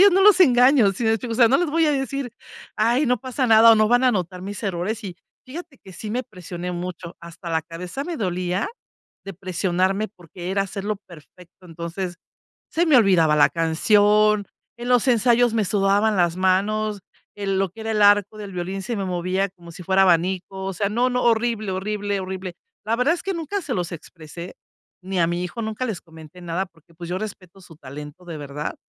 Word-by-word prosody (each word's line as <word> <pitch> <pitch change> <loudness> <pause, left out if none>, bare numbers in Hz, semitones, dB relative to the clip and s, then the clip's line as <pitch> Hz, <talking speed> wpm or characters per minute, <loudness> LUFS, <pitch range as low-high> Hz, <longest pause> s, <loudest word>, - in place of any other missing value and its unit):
ellos 400 -2 +7
no 385 +1 +4
los 410 -2 +6
engaño, 250 - +6
¿si 230 - -4
me 220 - +3
explico? 230 +2 -1
o - - -2
sea, 235 -2 +6
no 270 - +4
les 350 -4 0
voy 325 +1 +2
a 300 - +3
decir: 270 -2 -3 0.4
"Ay, 240 +6 +2
no 250 -1 +2
pasa 260 0 -2
nada, 225 0 +7
o 225 - +8
no 215 0 +4
van 245 +3 +3
a - - +6
anotar 180 -5 -2
mis 200 0 -6
errores", 200 +4 -3
y 180 -3 -6 0.3
fíjate 305 0 -9
que 190 - -14
sí 210 +3 -7
me 250 +3 -1
presioné 180 -1 -7
mucho. 175 -1 -6
Hasta 170 0 -9
la 160 0 +1
cabeza 175 +11 -6
me 340 -1 -4
dolía 180 - -1 0.6
de 195 -2 -7
presionarme 185 +3 -1
porque 180 -1 -9
era 195 +1 +1
hacerlo 200 +2 -4
perfecto. 175 +2 -16
Entonces, 170 +2 -5 0.5
se 340 +2 +1
me 295 -5 +5
olvidaba 175 -9 +4
la 145 - +6
canción, 205 +5 +3 0.3
en 240 - -5
los 250 0 +3
ensayos 240 0 +4
me 220 - +2
sudaban 205 +2 +2
las 175 -1 +2
manos, 205 +3 +1 0.4
en 195 -1 -1
lo 195 -1 0
que 220 +5 -13
era 220 - -3
el 210 - 0
arco 205 +1 +4
del 205 -2 -7
violín 185 +2 -4
se 235 +3 -3
me 195 - -2
movía 185 +2 -1
como 175 -2 -14
si 180 - -10
fuera 190 +2 +3
abanico, 185 +2 +1
o 195 - -2
sea, 200 +1 0
no, 245 +5 +1
no, 250 0 0
horrible, 225 -3 +1
horrible, 205 +1 -2
horrible. 185 -1 -6 0.3
La 230 +1 +1
verdad 260 +6 +3
es 350 - -7
que 390 -1 -2
nunca 335 +5 -3
se 265 -6 -3
los 175 -2 -3
expresé, 170 +1 -9 0.5
ni 185 -1 -2
a 165 - +4
mi 175 +1 -2
hijo 205 +6 -6
nunca 220 +3 -3
les 210 -7 -4
comenté 160 +1 -14
nada 175 +2 -2
porque, 170 -1 -26
pues, 170 +1 -8
yo 185 - -1
respeto 195 -3 -8
su 170 -3 -15
talento 150 +4 -10
de 165 -3 -7
verdad 145 +1 -5
195 Hz, 210 wpm, -22 LUFS, 175-230 Hz, 0.6 s, o